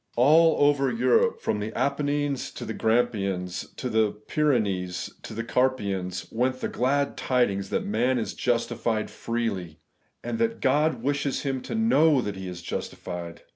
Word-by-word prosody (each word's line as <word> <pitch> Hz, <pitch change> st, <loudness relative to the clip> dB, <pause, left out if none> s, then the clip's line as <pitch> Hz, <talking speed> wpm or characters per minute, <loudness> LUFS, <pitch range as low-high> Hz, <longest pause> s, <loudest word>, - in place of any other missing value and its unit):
All 155 Hz, +4 st, +5 dB
over 140 Hz, -2 st, +2 dB
Europe, 125 Hz, +1 st, +2 dB
from 105 Hz, -, -1 dB
the 105 Hz, +1 st, -3 dB
Apennines 145 Hz, -1 st, 0 dB
to -, -, -6 dB
the -, -, -4 dB
Grampians, 100 Hz, -6 st, 0 dB
from 125 Hz, -, -3 dB
the 110 Hz, -1 st, +3 dB
Pyrenees 105 Hz, -8 st, -1 dB
to 110 Hz, -, -8 dB
the 115 Hz, -, -2 dB
Carpathians, 100 Hz, -8 st, -1 dB
went 130 Hz, +2 st, 0 dB
the -, -, -2 dB
glad 140 Hz, +3 st, 0 dB
tidings 100 Hz, -7 st, 0 dB
that -, -, -1 dB
man 120 Hz, +5 st, +1 dB
is 115 Hz, -, -2 dB
justified 115 Hz, -2 st, -1 dB
freely, 100 Hz, -9 st, -3 dB, 0.5 s
and 230 Hz, -, -3 dB
that 230 Hz, 0 st, 0 dB
God 150 Hz, +4 st, +2 dB
wishes 140 Hz, 0 st, -1 dB
him 135 Hz, -2 st, -2 dB
to -, -, -5 dB
know 160 Hz, -, +4 dB
that 105 Hz, -5 st, -3 dB
he 95 Hz, -1 st, -6 dB
is 90 Hz, -2 st, -7 dB
justified. 85 Hz, -2 st, -6 dB
120 Hz, 155 wpm, -26 LUFS, 100-140 Hz, 0.5 s, All